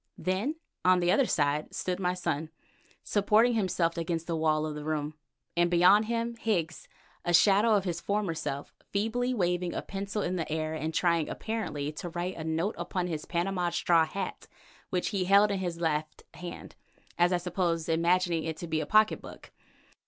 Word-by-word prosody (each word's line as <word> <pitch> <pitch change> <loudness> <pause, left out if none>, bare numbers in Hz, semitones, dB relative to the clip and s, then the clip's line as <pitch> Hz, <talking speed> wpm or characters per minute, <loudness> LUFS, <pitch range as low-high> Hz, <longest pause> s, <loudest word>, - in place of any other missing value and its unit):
Then 195 +12 -1 0.3
on 185 0 +5
the 175 0 +2
other 265 +4 +3
side 150 0 0
stood 180 0 -2
my 180 -1 0
son, 160 -3 -2 0.5
supporting 215 +4 +3
himself 180 -5 0
against 165 0 -2
the 165 - -2
wall 155 -1 +1
of 155 - -3
the 150 0 -6
room, 150 -1 -2 0.4
and 175 0 +3
beyond 180 +5 +5
him 235 +1 -2
Higgs, 175 -8 -2 0.4
a 175 0 +3
shadow 205 +5 +5
of 200 - +2
his 175 -3 -3
former 205 -4 -1
self, 145 -3 -5 0.2
feebly 225 +5 0
waving 180 -5 0
a - - -3
pencil 200 +1 -3
in 185 +1 -1
the 165 -2 -3
air 155 0 -1
and 160 0 -3
trying, 170 -1 +1
apparently, 185 -10 -3
to 155 +3 -6
write 175 +2 -3
a 160 - -6
note 160 +7 -1
upon 180 -3 -2
his 160 -4 -4
Panama 175 0 -1
straw 170 -1 +3
hat, 190 +3 -5 0.4
which 180 -1 -1
he 195 -4 -1
held 200 +2 +5
in 195 - -1
his 175 -3 -3
left 155 -2 -2
hand, 175 -1 -8 0.5
as 175 +1 +4
I 180 - +3
suppose, 175 -2 -1
imagining 170 0 +2
it 160 -1 -4
to 170 - -6
be 160 -1 0
his 150 - -3
pocket 215 +3 +4
book. - - -12
175 Hz, 185 wpm, -29 LUFS, 160-195 Hz, 0.5 s, on